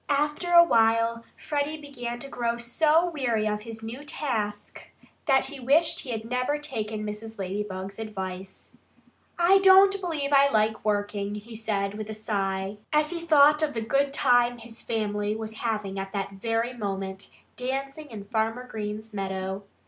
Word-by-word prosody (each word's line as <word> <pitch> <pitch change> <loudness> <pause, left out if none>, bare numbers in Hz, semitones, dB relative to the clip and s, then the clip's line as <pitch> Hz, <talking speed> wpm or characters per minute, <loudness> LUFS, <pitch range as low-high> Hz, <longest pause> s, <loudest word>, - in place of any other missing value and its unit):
After 295 +4 0
a 340 0 +9
while 230 -3 +2
Freddie 295 +1 -2
began 245 -5 -6
to 275 - -7
grow 235 -3 -2
so 310 +8 +2
weary 235 -8 0
of 210 0 -1
his 225 0 -8
new 235 +6 -6
task 220 -9 -3 0.5
that 265 -2 +4
he 275 +1 -3
wished 285 +6 +3
he 265 - -8
had 225 -2 -3
never 250 +5 0
taken 220 -7 -4
Mrs. 220 +1 -7
Ladybug's 195 0 -4
advice. 190 -3 -6 0.7
"I 360 +3 +5
don't 390 +1 +7
believe 300 -6 -2
I 280 0 +6
like 220 -2 +1
working," 205 -1 -1
he 220 +2 -9
said 205 -3 -1
with 215 0 -5
a 215 - -4
sigh, 195 -2 -2
as 300 +1 +3
he 340 -1 -3
thought 300 -2 +5
of 300 -3 0
the 225 - -1
good 275 +5 +1
time 245 -3 +3
his 230 -1 -8
family 210 -2 -1
was 220 0 -6
having 210 -4 -2
at 195 +1 -6
that 200 -1 -2
very 225 +4 -1
moment, 195 -3 -4 0.3
dancing 275 +4 -4
in 210 -4 -8
Farmer 225 +3 -1
Green's 215 -1 -6
meadow. 190 0 -3
225 Hz, 165 wpm, -27 LUFS, 210-280 Hz, 0.7 s, a